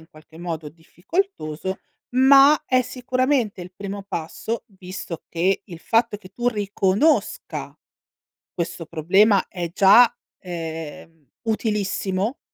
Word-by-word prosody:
in 160 - -18
qualche 155 +1 -17
modo 165 -3 -5
difficoltoso, 180 - -4 0.4
ma 275 +3 +7
è 255 0 +3
sicuramente, 255 -4 -1
il 180 +1 -11
primo 200 0 -6
passo, 195 +5 -4
visto 185 -2 -7
che 185 +4 0
il 175 -5 -10
fatto 230 +2 +1
che 190 -2 -15
tu 240 +4 -1
riconosca 205 +5 0 0.8
questo 170 -1 -4
problema 190 +6 +3
è 175 -3 -5
già, 205 +6 +7 0.3
ehm, 165 -3 -7 0.2
utilissimo 210 0 -1
195 Hz, 110 wpm, -23 LUFS, 170-230 Hz, 0.8 s, ma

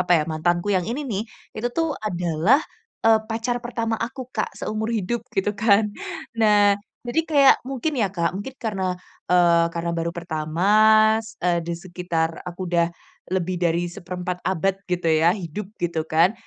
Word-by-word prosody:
apa 180 - -3
ya 155 - +2
mantanku 175 +4 0
yang 180 - 0
ini 245 +5 -2
nih, 205 -3 -1 0.3
itu 230 +3 -1
tuh 330 0 +2 0.2
adalah, 175 - +2 0.4
eee, 225 -1 +6
pacar 230 +2 -1
pertama 230 -2 -2
aku 260 +3 -8
Kak 215 - -1
seumur 215 +1 -3
hidup 225 +4 -1 0.2
gitu 195 +2 +1
kan. 215 -1 +5 0.6
Nah, 205 -2 +5 0.3
jadi 240 +7 +1
kayak 280 -3 +7
mungkin 275 +4 -2
ya 205 - +2
Kak, 170 -3 +1
mungkin 225 +7 -6
karena, 190 -4 -1 0.3
eee, 175 -1 +5
karena 170 0 -2
baru 165 0 -1
pertama, 160 -1 -4 0.6
s 225 - -12
eee, 175 -1 +2
di 170 - -3
sekitar 175 -2 -1 0.2
aku 175 +1 -10
udah 170 -1 +2 0.4
lebih 185 0 -1
dari 175 0 +1
1/4 180 -1 -5
abad 190 +1 +1
gitu 180 -1 -2 0.2
ya 170 +5 +4
hidup 185 +2 -6
gitu 170 -2 -1
kan. 165 +5 +5
185 Hz, 165 wpm, -23 LUFS, 170-220 Hz, 0.6 s, kayak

